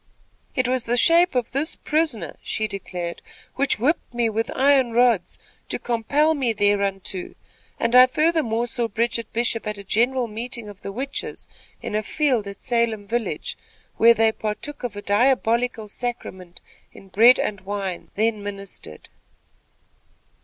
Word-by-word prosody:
"It 255 -1 +1
was 250 -2 0
the 240 +1 +1
shape 340 +4 +5
of 245 -2 -1
this 290 +5 0
prisoner," 300 - -1
she 220 - -2
declared, 180 -3 -6 0.3
"which 275 0 +1
whipped 290 +9 0
me 235 -1 +1
with 225 +2 -1
iron 265 -3 +3
rods, 235 -5 +2 0.3
to - - -1
compel 280 +7 +1
me 260 -6 0
thereunto, 200 -3 -1 0.4
and 230 +1 +1
I 255 0 +9
furthermore 255 -5 +1
saw 240 0 -1
Bridget 230 +1 -1
Bishop 230 -1 0
at 210 -1 -3
a 200 - -9
general 240 +5 +1
meeting 230 0 -6
of 205 -1 -13
the 195 - -6
witches, 265 +6 -5 0.4
in - - -5
a 215 - +1
field 250 -3 0
at 200 0 -9
Salem 235 -4 0
village, 230 +3 -3 0.4
where 230 +1 +6
they 225 0 +3
partook 220 +7 -5
of 240 -4 -4
a 205 - -7
diabolical 235 0 +1
sacrament 190 -6 -6 0.3
in 195 - -15
bread 230 +7 +6
and 205 -2 -2
wine, 195 -2 -4
then 220 +1 +1
administered." 200 - -8
230 Hz, 150 wpm, -23 LUFS, 205-250 Hz, 0.4 s, I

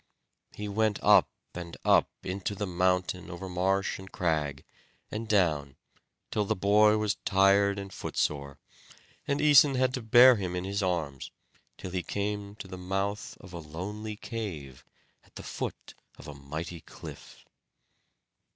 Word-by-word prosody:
He 105 - -5
went 105 0 +1
up - - +6 0.2
and 85 -1 -7
up - - +5
into 95 +2 -3
the 105 - -2
mountain 90 0 0
over 90 +2 -7
marsh, 95 +2 0
and 95 0 -11
crag, 75 -6 -1 0.5
and 110 +1 -4
down, 75 -10 +1 0.6
till 105 - +1
the 100 - -1
boy 105 +3 +4
was 105 -1 0
tired 100 +1 +4
and 100 -1 -7
footsore, 70 -2 -2 0.7
and 140 - 0
Æson 145 -2 +6
had 130 0 +2
to 125 - -2
bear 120 +2 +7
him 90 -3 -3
in 90 - -2
his 100 +2 -2
arms, 80 -8 -2 0.5
till 95 - -7
he 90 0 -1
came 100 +1 -3
to 100 - -9
the 95 -1 -8
mouth 95 +3 -3
of 90 - -13
a 85 - -5
lonely 100 +8 -6
cave, 85 - -6 0.4
at - - -27
the - - -8
foot - - -6 0.2
of - - -12
a 75 - -7
mighty 80 +5 -6
cliff. - - -12
95 Hz, 150 wpm, -29 LUFS, 85-105 Hz, 0.7 s, bear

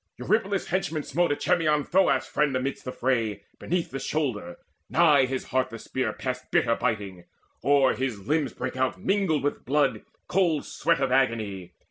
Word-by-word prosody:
Eurypylus' 205 -3 0
henchman 165 -4 -1
smote 170 +6 +1
Echemmon, 150 0 +2
Thoas' 190 +6 +2
friend, 150 -3 0
amidst 130 +2 -3
the 125 - -3
fray 115 -6 -1 0.2
Beneath 175 0 -2
the 135 - -4
shoulder: 115 - -2 0.3
nigh 150 -6 +5
his 130 0 -3
heart 130 0 +1
the 115 - -7
spear 130 +3 -2
Passed 130 -1 -5
bitter 115 - +3
biting: 100 -7 -3 0.4
o'er 140 -2 +4
his 115 -7 -4
limbs 150 -4 +1
brake 130 +1 -4
out 130 0 -1
Mingled 190 -6 +1
with 145 - -2
blood 145 +1 +1 0.3
cold 170 -5 +1
sweat - - 0
of 135 -2 +1
agony. 110 -8 0
135 Hz, 160 wpm, -26 LUFS, 125-155 Hz, 0.4 s, nigh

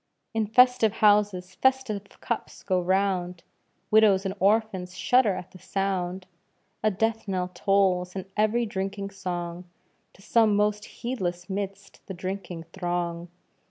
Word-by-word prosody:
"In 220 -1 0
festive 250 -1 +5
houses 205 -4 +3
festive 260 -3 +1 0.2
cups 235 - -4
go 185 -2 +1
round!" 180 -1 0 0.5
Widows 210 -3 +5
and 190 - -1
orphans 195 -3 +1
shudder 210 +2 +3
at 180 - -8
the 185 - -14
sound. 190 -2 -2 0.6
A 215 - +3
death 225 +2 -1
knell 185 -2 -2
tolls 185 -1 +1
in 190 -1 -4
every 215 +3 +2
drinking 195 -1 -4
song, 175 -2 -5 0.5
To 195 - -19
some 220 -1 +3
most 210 0 +1
heedless 180 -7 -4
'midst 195 0 -5
the 190 - -6
drinking 185 -2 -5
throng. 175 -2 -2
195 Hz, 130 wpm, -26 LUFS, 180-215 Hz, 0.6 s, festive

